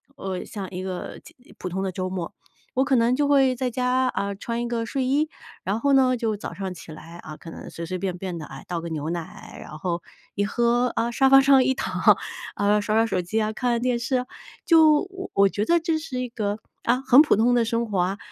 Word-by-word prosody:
呃， 190 Hz, -7 st, -5 dB
像 195 Hz, -4 st, -6 dB
一 180 Hz, -, -5 dB
个 185 Hz, -1 st, -6 dB, 0.4 s
普 -, -, -6 dB
通 190 Hz, +2 st, -3 dB
的 190 Hz, -, -2 dB
周 185 Hz, 0 st, -3 dB
末， 180 Hz, -3 st, -5 dB, 0.4 s
我 265 Hz, +1 st, +2 dB
可 270 Hz, -1 st, +2 dB
能 235 Hz, 0 st, +3 dB
就 290 Hz, 0 st, +2 dB
会 270 Hz, -2 st, +4 dB
在 255 Hz, 0 st, -2 dB
家， 255 Hz, +1 st, +1 dB
啊， 200 Hz, -4 st, -2 dB
穿 230 Hz, +4 st, -4 dB
一 -, -, -2 dB
个 230 Hz, -1 st, -2 dB
睡 260 Hz, +3 st, -2 dB
衣， 290 Hz, +4 st, +1 dB, 0.4 s
然 195 Hz, +3 st, 0 dB
后 280 Hz, -, +2 dB
呢， 260 Hz, -2 st, +4 dB
就 225 Hz, -3 st, -2 dB
早 -, -, -7 dB
上 190 Hz, -2 st, -5 dB
起 165 Hz, -1 st, -11 dB
来， 165 Hz, +2 st, -11 dB
啊， 155 Hz, -3 st, -9 dB
可 165 Hz, -, -11 dB
能 -, -, -9 dB
随 170 Hz, -, -7 dB
随 185 Hz, +3 st, -4 dB
便 185 Hz, -1 st, -3 dB
便 180 Hz, -1 st, -5 dB
的， 155 Hz, -, -7 dB
哎， 135 Hz, -1 st, -10 dB
倒 175 Hz, -1 st, -2 dB
个 165 Hz, -, -6 dB
牛 155 Hz, -1 st, -3 dB
奶， 170 Hz, +1 st, -7 dB
然 155 Hz, -, -9 dB
后 170 Hz, +1 st, -2 dB, 0.3 s
一 205 Hz, -, +1 dB
喝 240 Hz, +3 st, +1 dB
啊， 230 Hz, +1 st, 0 dB
沙 270 Hz, +2 st, +3 dB
发 270 Hz, 0 st, +8 dB
上 270 Hz, -1 st, +6 dB
一 265 Hz, -, +2 dB
躺， -, -, +2 dB, 0.4 s
啊， 205 Hz, +1 st, +2 dB
刷 215 Hz, +1 st, -1 dB
刷 225 Hz, +1 st, +4 dB
手 190 Hz, -5 st, -1 dB
机 210 Hz, +6 st, -1 dB
啊， 215 Hz, 0 st, 0 dB
看 245 Hz, +3 st, -1 dB
看 235 Hz, -1 st, 0 dB
电 245 Hz, -1 st, 0 dB
视 255 Hz, +2 st, 0 dB
啊， 250 Hz, -, -4 dB, 0.4 s
就 315 Hz, -1 st, +5 dB, 0.3 s
我 200 Hz, 0 st, +4 dB
觉 205 Hz, +2 st, -2 dB
得 340 Hz, +5 st, +3 dB
这 325 Hz, -1 st, 0 dB
是 270 Hz, -5 st, -5 dB
一 250 Hz, -, -2 dB
个， 210 Hz, -3 st, -2 dB, 0.3 s
啊， 245 Hz, +2 st, +2 dB
很 265 Hz, +2 st, +8 dB
普 305 Hz, -, +4 dB
通 235 Hz, +3 st, +3 dB
的 240 Hz, -, +3 dB
生 230 Hz, +1 st, 0 dB
活 200 Hz, -, -2 dB
啊。 185 Hz, +3 st, 0 dB
225 Hz, 260 characters per minute, -24 LUFS, 185-255 Hz, 0.4 s, 发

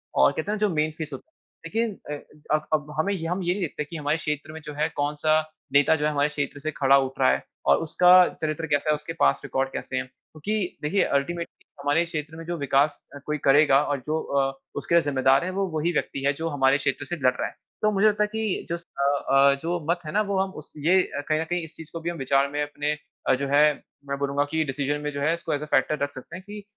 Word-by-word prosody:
और 70 Hz, -, +5 dB
कहते 160 Hz, +6 st, -3 dB
है -, -, 0 dB
ना -, -, -8 dB
जो -, -, -2 dB
मेन 155 Hz, +1 st, +1 dB
फ़ीसद, 150 Hz, -4 st, -5 dB, 0.5 s
लेकिन 220 Hz, +4 st, -1 dB
अ, -, -, -1 dB, 0.4 s
अब 155 Hz, 0 st, -3 dB
अब, 150 Hz, -1 st, 0 dB
हमें 200 Hz, +5 st, +1 dB
हम 180 Hz, +2 st, -2 dB
ये 175 Hz, -, +1 dB
नहीं 200 Hz, -, -4 dB
देखते 155 Hz, -3 st, -2 dB
कि 165 Hz, -, -10 dB
हमारे 150 Hz, +1 st, 0 dB
क्षेत्र 150 Hz, -1 st, -3 dB
में 160 Hz, -, -8 dB
जो 150 Hz, -, -6 dB
है 150 Hz, +2 st, 0 dB
कौन-सा 150 Hz, +2 st, +2 dB, 0.3 s
नेता 145 Hz, +2 st, +5 dB
जो 150 Hz, -1 st, -1 dB
है 150 Hz, -, +2 dB
हमारे 145 Hz, 0 st, +1 dB
क्षेत्र 145 Hz, -1 st, -3 dB
से 155 Hz, +2 st, -3 dB
खड़ा 140 Hz, -2 st, +4 dB
उठ 135 Hz, -1 st, -2 dB
रहा 130 Hz, -, +5 dB
है। -, -, -1 dB, 0.2 s
और -, -, +5 dB
उसका 170 Hz, +2 st, +3 dB, 0.3 s
चरित्र 155 Hz, +1 st, -2 dB
कैसा 145 Hz, 0 st, +1 dB
है 150 Hz, -, +4 dB
उसके 150 Hz, +2 st, -7 dB
पास्ट 70 Hz, 0 st, +3 dB
रिकॉर्ड 135 Hz, 0 st, -1 dB
कैसे -, -, -4 dB
है? -, -, 0 dB
क्योंकि 175 Hz, +9 st, -5 dB
देखिए 180 Hz, +7 st, +2 dB
अल्टीमेटली 170 Hz, +5 st, -2 dB, 0.2 s
हमारे 145 Hz, +4 st, +2 dB
क्षेत्र 155 Hz, -2 st, -5 dB
में 165 Hz, -, -7 dB
जो 175 Hz, +1 st, -3 dB
विकास 140 Hz, 0 st, +2 dB, 0.2 s
अ, -, -, -8 dB
कोई 150 Hz, 0 st, -1 dB
करेगा 140 Hz, 0 st, +6 dB
और 145 Hz, -2 st, -1 dB
जो 155 Hz, +1 st, 0 dB
अ, 135 Hz, -1 st, 0 dB, 0.2 s
उसके 155 Hz, +4 st, 0 dB
लिए 170 Hz, -, +7 dB
ज़िम्मेदार 135 Hz, -1 st, +3 dB
है 185 Hz, -, -2 dB
वो 195 Hz, +1 st, 0 dB
वही 165 Hz, +3 st, +1 dB
व्यक्ति 135 Hz, -, -2 dB
है 140 Hz, -, +3 dB
जो 165 Hz, +3 st, -3 dB
हमारे 135 Hz, -1 st, +3 dB
क्षेत्र 135 Hz, -1 st, -2 dB
से 175 Hz, -, -3 dB
लड़ 130 Hz, -5 st, +2 dB
रहा -, -, -2 dB
है। -, -, -12 dB, 0.3 s
तो 215 Hz, -, +3 dB
मुझे 205 Hz, +1 st, +4 dB
लगता 210 Hz, 0 st, +3 dB
है -, -, +1 dB
कि 220 Hz, -3 st, -1 dB
जस्ट 170 Hz, 0 st, -4 dB
अ 140 Hz, 0 st, +1 dB
अ, 140 Hz, 0 st, +6 dB
जो 175 Hz, +2 st, -1 dB
मत 175 Hz, +1 st, +2 dB
है 150 Hz, -, -4 dB
ना 210 Hz, -, +2 dB
वो 200 Hz, -2 st, 0 dB
हम 190 Hz, 0 st, 0 dB
उस -, -, -22 dB
ये 185 Hz, +3 st, +5 dB, 0.3 s
कहीं 155 Hz, 0 st, +2 dB
न -, -, 0 dB
कहीं 175 Hz, +1 st, -2 dB
इस 160 Hz, -, -10 dB
चीज़ 160 Hz, -2 st, -11 dB
को 165 Hz, -, -4 dB
भी 170 Hz, -, -2 dB
हम 170 Hz, -, -5 dB
विचार 135 Hz, 0 st, +2 dB
में 145 Hz, +1 st, -1 dB
अपने 145 Hz, 0 st, -2 dB, 0.4 s
अ, -, -, +6 dB
जो 140 Hz, +2 st, -3 dB
है 145 Hz, +2 st, +5 dB, 0.5 s
मैं 140 Hz, -, -1 dB
बोलूँगा 140 Hz, 0 st, +1 dB
की 160 Hz, 0 st, +1 dB
डिसीज़न 145 Hz, +1 st, -2 dB
में 150 Hz, 0 st, -3 dB
जो 140 Hz, -1 st, -5 dB
है 155 Hz, +3 st, +2 dB
इसको 170 Hz, -, -3 dB
एज़ 145 Hz, 0 st, -2 dB
ए -, -, -4 dB
फैक्टर 145 Hz, +2 st, +2 dB
रख 145 Hz, 0 st, -2 dB
सकते 135 Hz, +5 st, -9 dB
हैं 185 Hz, -, -9 dB
कि 210 Hz, 0 st, -8 dB
150 Hz, 260 wpm, -25 LUFS, 140-170 Hz, 0.5 s, लिए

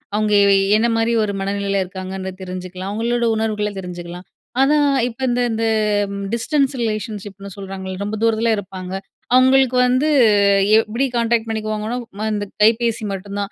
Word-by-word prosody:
அவங்க 210 Hz, 0 st, +1 dB
எ 200 Hz, 0 st, +5 dB, 0.2 s
என்ன 225 Hz, +2 st, +3 dB
மாரி 225 Hz, +1 st, +1 dB
ஒரு 205 Hz, -, -1 dB
மனநிலையில 200 Hz, 0 st, -1 dB
இருக்காங்கன்னு 190 Hz, +1 st, -6 dB
தெரிஞ்சுக்கலாம். 185 Hz, 0 st, -6 dB
அவங்களோட 235 Hz, +3 st, 0 dB
உணர்வுகள 215 Hz, -1 st, -1 dB
தெரிஞ்சுக்கலாம். 175 Hz, -1 st, -8 dB, 0.4 s
ஆனா, 285 Hz, +3 st, +4 dB, 0.3 s
இப்போ 245 Hz, +1 st, -9 dB
இந்த 245 Hz, 0 st, +1 dB
இந்த 225 Hz, 0 st, -1 dB, 0.7 s
டிஸ்டன்ஸ் 275 Hz, +3 st, +1 dB
ரிலேஷன்ஷிப்னு 205 Hz, -2 st, -4 dB
சொல்றாங்கல்ல, 190 Hz, -1 st, -6 dB
ரொம்ப 210 Hz, +2 st, -3 dB
தூரத்தில 230 Hz, 0 st, +2 dB
இருப்பாங்க. 185 Hz, -2 st, -7 dB, 0.4 s
அவங்களுக்கு 260 Hz, 0 st, +4 dB
வந்து, 255 Hz, +5 st, +2 dB, 0.7 s
எப்டி 225 Hz, +4 st, 0 dB
கான்டாக்ட் 230 Hz, -1 st, +1 dB
பண்ணிக்குவாங்கன்னா, 215 Hz, +1 st, -3 dB, 0.2 s
ம 215 Hz, -, -1 dB
இந்த 205 Hz, -1 st, -2 dB, 0.2 s
கைபேசி 230 Hz, +1 st, +2 dB
மட்டும் 200 Hz, +1 st, -6 dB
தான், 200 Hz, +1 st, -3 dB
215 Hz, 140 wpm, -20 LUFS, 195-230 Hz, 0.7 s, எ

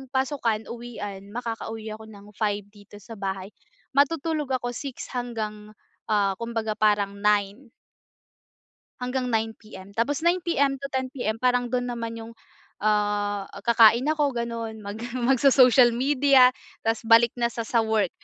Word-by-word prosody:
pasukan, 255 Hz, -5 st, 0 dB
uwian, 205 Hz, -5 st, -7 dB
makakauwi 225 Hz, -2 st, -5 dB
ako 220 Hz, -, -12 dB
ng 205 Hz, -1 st, -14 dB
5:00 205 Hz, -2 st, -1 dB
dito 205 Hz, 0 st, -16 dB
sa 225 Hz, +3 st, -11 dB
bahay, 190 Hz, -1 st, -4 dB, 0.5 s
matutulog 300 Hz, 0 st, +1 dB
ako, 245 Hz, +1 st, -4 dB
6:00 270 Hz, +1 st, -6 dB
hanggang, 215 Hz, -4 st, -5 dB, 0.4 s
ah, 200 Hz, -2 st, +3 dB
kumbaga 225 Hz, -2 st, -3 dB
parang 205 Hz, -2 st, +2 dB
9:00. 210 Hz, +4 st, +1 dB, 1.3 s
Hanggang 250 Hz, 0 st, -2 dB
9:00 225 Hz, -1 st, 0 dB
PM. 200 Hz, -3 st, -13 dB
Tapos 235 Hz, +6 st, 0 dB
9:00 350 Hz, +1 st, +3 dB
PM 285 Hz, -5 st, +1 dB
to 275 Hz, +1 st, -7 dB
10:00 260 Hz, -1 st, -1 dB
PM, 225 Hz, -4 st, -2 dB
parang 245 Hz, -1 st, +1 dB
do'n 245 Hz, -1 st, -1 dB
naman 230 Hz, -1 st, -5 dB
yung, 225 Hz, 0 st, -9 dB, 0.5 s
ah, 205 Hz, -1 st, 0 dB, 0.2 s
kakain 230 Hz, +1 st, +6 dB
ako 295 Hz, -4 st, +1 dB
gano'n, 230 Hz, -1 st, -4 dB
mag 205 Hz, +1 st, -6 dB, 0.2 s
mag-so-social 255 Hz, -1 st, +5 dB
media, 265 Hz, 0 st, +5 dB, 0.3 s
'tas 225 Hz, 0 st, -1 dB
balik 230 Hz, +1 st, +6 dB
na 235 Hz, -, +2 dB
sa 235 Hz, 0 st, -4 dB
sa 230 Hz, +1 st, 0 dB
work. 220 Hz, -4 st, +1 dB
230 Hz, 140 wpm, -25 LUFS, 210-250 Hz, 1.3 s, kakain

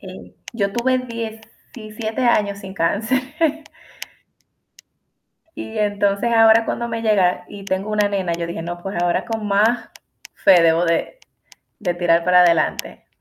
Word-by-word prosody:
Eh, 185 Hz, -1 st, -12 dB, 0.2 s
yo 200 Hz, -3 st, -1 dB
tuve 255 Hz, +3 st, +1 dB
17 225 Hz, -1 st, -7 dB
años 210 Hz, -5 st, +1 dB
sin 190 Hz, 0 st, -9 dB
cáncer. 220 Hz, +9 st, 0 dB, 2.4 s
Y 220 Hz, 0 st, -7 dB
entonces 205 Hz, +2 st, 0 dB
ahora 225 Hz, 0 st, +5 dB
cuando 235 Hz, -, -3 dB
me 230 Hz, -1 st, -4 dB
llega, 200 Hz, -5 st, +1 dB
y 200 Hz, -1 st, -10 dB
tengo 195 Hz, +2 st, -3 dB
una 210 Hz, -1 st, +2 dB
nena, 190 Hz, -4 st, -2 dB
yo 170 Hz, 0 st, -4 dB
dije, 170 Hz, -1 st, -5 dB
no, 175 Hz, +1 st, -6 dB
pues 195 Hz, -2 st, -4 dB
ahora 175 Hz, 0 st, 0 dB
con 225 Hz, -2 st, -4 dB
más 220 Hz, +4 st, +1 dB, 0.5 s
fé 185 Hz, -4 st, +5 dB
debo 165 Hz, +1 st, +3 dB
de 170 Hz, -, -1 dB, 0.6 s
de 180 Hz, -6 st, -1 dB
tirar 170 Hz, -1 st, +2 dB
para 180 Hz, 0 st, +5 dB
adelante. 170 Hz, -3 st, 0 dB
205 Hz, 140 wpm, -20 LUFS, 180-225 Hz, 2.4 s, ahora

